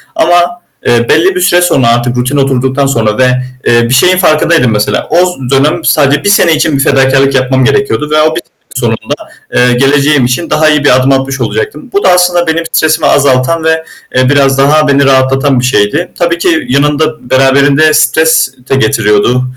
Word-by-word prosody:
ama, 175 +1 0 0.2
eee, 120 0 0
belli 180 +4 +2
bir 180 - -2
süre 180 -1 +2
sonra 135 -8 +1
artık 120 +1 0
rutin 130 +4 -2
oturduktan 135 0 -1
sonra 115 -5 -1
ve, 130 0 +2 0.4
eee, 120 0 +2
bir - - -1
şeyin 180 +8 +3
farkındaydım 155 -7 +1
mesela. 105 -1 -2
O - - 0 0.3
dönem 150 +5 0
sadece 145 -1 +1
bir - - 0
sene 180 -5 +3
için 155 -2 -1
bir 135 - 0
fedakârlık 135 0 +1
yapmam 130 0 0
gerekiyordu 140 0 -1
ve 155 0 +2
o 155 +1 0
bir - - -3
sene - - -36 0.3
sonunda, - - -3 0.4
eee, 125 0 +2
geleceğim 140 +1 +1
için 125 +7 -3
daha 155 0 +1
iyi 150 -1 0
bir 145 - +3
adım 130 +1 +1
atmış 135 -1 -2
olacaktım. 425 - -4
Bu 400 - -1
da - - +3
aslında 180 -1 +1
benim 160 +1 -1
stresimi 160 0 0
azaltan 140 +3 +1
ve, 160 0 0 0.3
eee, 130 0 +2
biraz 135 -2 +1
daha 150 +2 +2
beni 140 0 +2
rahatlatan 135 0 +1
bir 125 - -2
şeydi. 130 - -1
Tabii 170 -1 -1
ki 170 -1 -1
yanında 150 +1 -1
beraberinde 140 +3 +2
stres 160 +1 +1 0.2
de - - +1
getiriyordu 120 -2 0
140 Hz, 185 wpm, -8 LUFS, 130-160 Hz, 0.4 s, şeyin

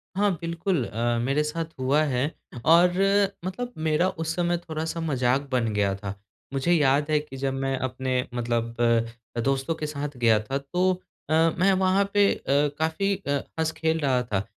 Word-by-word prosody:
हाँ, 205 0 +3
बिल्कुल। 170 -3 -1
अ, 120 +2 -1
मेरे 140 +4 +1
साथ 165 +2 -3
हुआ 140 +4 +2
है 130 -3 0 0.4
और 170 +3 +6 0.6
मतलब 245 +7 -4
मेरा 155 +4 +3
उस 165 0 -3
समय 175 -1 +1
थोड़ा-सा 160 0 -4
मज़ाक 130 -3 +1
बन 115 -3 +1
गया 100 -1 +1
था। 100 0 -5 0.4
मुझे 135 +6 0
याद 145 -1 +3
है 150 - +4
कि 135 -3 -9
जब 135 0 -1
मैं 135 0 -1
अपने 130 0 -2
मतलब 115 -1 -1 0.7
दोस्तों 135 +4 0
के 155 - -4
साथ 145 -2 -5
गया 115 -3 +4
था, 135 +6 -3
तो 180 +6 0 0.3
अ, - - +1 0.3
मैं 195 +2 +5
वहाँ 190 +1 +3
पे 205 0 +5
अ, - - -10 0.4
काफ़ी 195 +5 +1
अ, - - +1 0.3
हँस-खेल 160 0 0
रहा 130 -4 +2
था। 100 -4 -1
145 Hz, 170 wpm, -25 LUFS, 130-170 Hz, 0.7 s, और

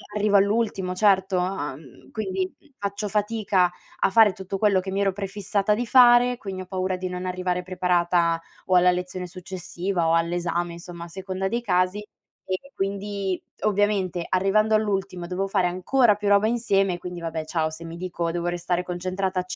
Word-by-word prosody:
arrivo 205 -1 +2
all'ultimo, 200 -2 +1
certo. 190 -2 +3
Uhm, 150 -7 -5
quindi 190 -3 -3 0.2
faccio 200 +1 -3
fatica 205 -3 +1 0.3
a - - +3
fare 215 -1 +6
tutto 190 0 -5
quello 205 -3 +4
che 190 +1 -5
mi 200 +1 0
ero 195 - +2
prefissata 200 +1 -1
di 235 +2 -2
fare, 245 0 +6
quindi 195 -5 -6
ho - - -7
paura 185 -1 -2
di 185 0 -4
non 180 0 -5
arrivare 180 0 -2
preparata 175 -2 +1 0.3
o 185 - +2
alla 180 0 +6
lezione 180 0 -4
successiva 180 0 -3
o 165 - +3
all'esame, 175 +1 0
insomma 170 0 -9
a - - -10
seconda 190 +2 -4
dei 235 +4 -1
casi 185 0 +1 0.5
e 190 +9 -4
quindi, 195 -1 -2 0.2
ovviamente, 200 -4 +1
arrivando 215 +4 +3
all'ultimo 195 -4 -1
dovevo 185 +2 -2
fare 190 -2 +1
ancora 210 +6 +3
più 210 0 -4
roba 200 +1 +5
insieme, 195 -6 +1
quindi, 180 -1 -7
vabbè, 165 -1 -3
ciao, 155 -1 -1
se 160 +2 -9
mi 165 +1 -7
dico 175 -2 -3
devo 170 0 -3
restare 175 0 -1
concentrata, 185 +1 -2
185 Hz, 170 wpm, -24 LUFS, 180-200 Hz, 0.5 s, fare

